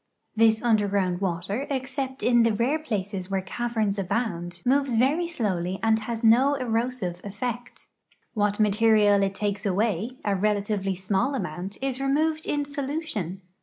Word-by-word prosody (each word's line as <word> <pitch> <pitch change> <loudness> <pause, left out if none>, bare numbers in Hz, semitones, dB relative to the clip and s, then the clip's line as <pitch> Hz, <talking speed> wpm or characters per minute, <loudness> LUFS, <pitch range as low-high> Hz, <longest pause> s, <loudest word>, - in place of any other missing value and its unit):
This 220 0 +4
underground 200 -5 +1
water, 195 +8 -2
except 265 0 -3
in 240 -1 +4
the 230 -1 +3
rare 250 +8 +1
places 200 -9 -4
where 195 -1 0
caverns 220 -1 -1
abound, 180 -4 -2
moves 270 -1 +2
very 285 +9 +2
slowly 190 - -2
and 220 0 +3
lias 225 +1 -5
no 250 +6 +5
erosive 230 -7 -2
effect. 240 +4 -5 0.5
What 205 -2 0
material 210 -1 +4
it 195 0 0
takes 205 -1 -2
away 215 +4 0
— - - -24
a 200 -1 +2
relatively 200 -1 0
small 195 +9 0
amount— 185 -3 -5
is 270 -1 -2
removed 310 +3 0
in 290 -1 0
solution. 280 - -4
220 Hz, 145 wpm, -26 LUFS, 195-255 Hz, 0.5 s, no